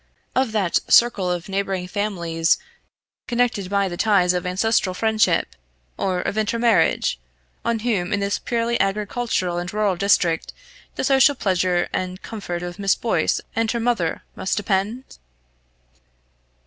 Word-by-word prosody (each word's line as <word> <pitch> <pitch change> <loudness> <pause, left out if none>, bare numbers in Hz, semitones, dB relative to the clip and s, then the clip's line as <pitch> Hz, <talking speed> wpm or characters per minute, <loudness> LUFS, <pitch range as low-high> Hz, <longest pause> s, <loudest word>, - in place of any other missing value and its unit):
of 260 -3 +1
that 200 -6 +1
circle 220 -6 +5
of 175 -1 -3
neighbouring 195 -2 -2
families 170 -5 0 0.7
connected 235 -6 0
by 200 -1 +1
the 175 - -5
ties 195 -4 +3
of 180 0 -2
ancestral 190 0 +1
friendship, 215 - +1 0.4
or 185 -2 -1
of 210 - -2
intermarriage, 215 - +2 0.4
on 235 0 0
whom 215 -6 -1
in 205 - +1
this 200 0 -1
purely 235 0 -1
agricultural 195 -2 -1
and 175 +1 -5
rural 210 -3 +1
district 175 -3 +1 0.4
the - - -3
social 270 +1 +4
pleasure 185 -5 +1
and 185 0 -3
comfort 180 -5 -5
of 175 +2 -7
Miss 195 -1 +2
Boyce 235 -3 0
and 225 0 +1
her 235 - -1
mother 225 -9 -1
must 190 - -2
depend? 210 +5 -2
200 Hz, 135 wpm, -22 LUFS, 180-225 Hz, 0.7 s, circle